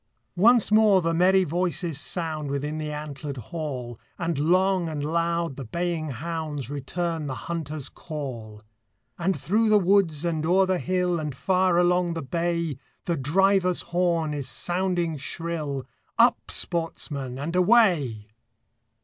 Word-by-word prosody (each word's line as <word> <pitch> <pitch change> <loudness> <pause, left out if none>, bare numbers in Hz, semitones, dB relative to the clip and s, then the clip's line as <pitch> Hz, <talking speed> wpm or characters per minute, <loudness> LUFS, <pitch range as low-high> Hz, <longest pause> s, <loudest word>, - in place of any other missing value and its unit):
Once 225 +4 +5
more 215 -3 +6
the 165 -1 0
merry 185 +3 +4
voices 170 -2 -1
sound 155 -4 -3
Within 145 +3 -3
the 155 -1 -4
antlered 150 -1 -6
hall, 125 - -5 0.2
And 170 -2 -1
long 185 +2 +2
and 150 -2 -4
loud 170 -1 -1
the 135 - -5
baying 170 +4 -2
hounds 150 -1 -4
Return 160 +3 -3
the 130 - -3
hunter's 155 -4 -4
call; 120 -9 -7 0.6
And 185 +2 0
through 220 +4 +2
the 215 - +6
woods, 180 -5 +2
and 160 -2 -1
o'er 185 +4 +4
the 185 -1 0
hill, 180 -1 0
And 150 -4 -4
far 185 +2 +2
along 175 -1 +2
the 165 - -4
bay, 170 -1 -1 0.3
The 170 - 0
driver's 185 +5 +2
horn 170 -3 0
is 140 -3 -4
sounding 175 +2 -1
shrill, 150 -2 -3 0.3
Up, - - +4
sportsmen, 145 -6 -1
and 155 +6 -4
away! 175 - +3
165 Hz, 140 wpm, -25 LUFS, 145-180 Hz, 0.6 s, more